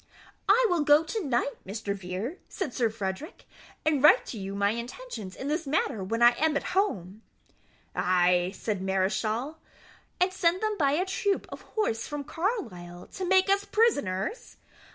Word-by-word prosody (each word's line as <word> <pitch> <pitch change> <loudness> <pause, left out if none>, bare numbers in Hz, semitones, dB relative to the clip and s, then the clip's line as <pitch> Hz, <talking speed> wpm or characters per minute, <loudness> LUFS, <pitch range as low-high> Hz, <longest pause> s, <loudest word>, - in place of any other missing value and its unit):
"I 475 +5 +6
will 350 -5 +1
go 295 +1 +5
to 410 +6 -3
night, 270 -1 0
Mr. 200 +1 -4
Vere," 195 - -5
said 355 -11 -4
Sir 235 -3 +1
Frederick, 215 - -5 0.4
"and 305 -3 +2
write 300 - +5
you 195 -3 -5
my 200 0 +2
intentions 235 - -6
in 270 - -6
this 310 +1 -1
matter 270 -7 0
when 230 +5 0
I 240 - +9
am 310 -2 +3
at - - -3
home." 215 - -1 0.7
"Ay," 180 0 +3
said 205 -2 -3
Mareschal, 215 +9 -1 0.6
"and 365 +1 +2
send 365 +1 +1
them 430 -1 +1
by 280 -2 +3
a 355 +5 +1
troop 390 +1 0
of - - -8 0.2
horse 225 - 0
from 295 -1 -4
Carlisle 185 - -4
to 380 - -3
make 375 +1 +4
us 395 +1 +3
prisoners? 405 - 0
270 Hz, 160 wpm, -28 LUFS, -, 0.7 s, I